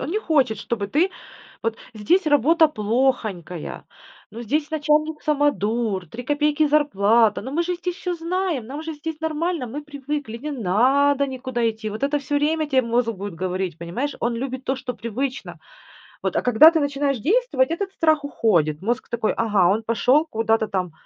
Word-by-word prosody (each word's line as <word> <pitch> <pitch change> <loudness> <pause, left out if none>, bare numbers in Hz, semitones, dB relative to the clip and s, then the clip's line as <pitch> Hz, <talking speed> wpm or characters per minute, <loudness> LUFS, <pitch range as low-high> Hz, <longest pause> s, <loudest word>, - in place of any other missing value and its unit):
он 270 - -4
не 415 - 0
хочет, 275 - +1
чтобы 205 -1 -3
ты. 315 - +1 0.5
Вот 225 0 -1 0.2
здесь 315 - +1
работа 310 +3 +4
плохонькая, 215 - -2 0.5
ну 225 +3 -8
здесь 290 +6 -1
начальник 305 0 0
самодур, 235 -9 0
3 230 +10 -8
копейки 295 +2 +2
зарплата, 230 -7 +3
ну 255 - -7
мы 335 +4 +1
же 360 +1 -2
здесь 355 0 -4
всё 360 -2 -3
знаем, 340 -6 -2
нам 285 +5 -6
же 320 0 -5
здесь 310 +1 -6
нормально, 320 -2 -2
мы 280 +6 -6
привыкли, 290 -4 -5
не 295 +6 -6
надо 270 +6 +2
никуда 255 -3 -2
идти. 220 -1 -4
Вот 215 +4 -7
это 280 +1 0
всё 285 +1 -4
время 310 +2 +1
тебе 265 -2 +3
мозг 235 0 +1
будет 200 -2 -7
говорить, 185 -2 -2
понимаешь, 235 +13 -3
он 235 0 0
любит 260 +2 -4
то, 265 - -1
что 255 -1 -5
привычно. 255 +4 -4 0.7
Вот. - - -1
А - - +2
когда 250 +7 +7
ты 330 - +1
начинаешь 280 -2 0
действовать, 325 - +1
этот 385 +3 -2
страх 315 -4 +2
уходит, 170 - +1
мозг 230 +5 -2
такой: 230 -2 0
"Ага, 210 -5 +3
он 215 +3 0
пошел 250 +7 +2
куда-то 225 -2 +1
там 185 -4 -2
265 Hz, 175 wpm, -22 LUFS, 220-300 Hz, 0.7 s, когда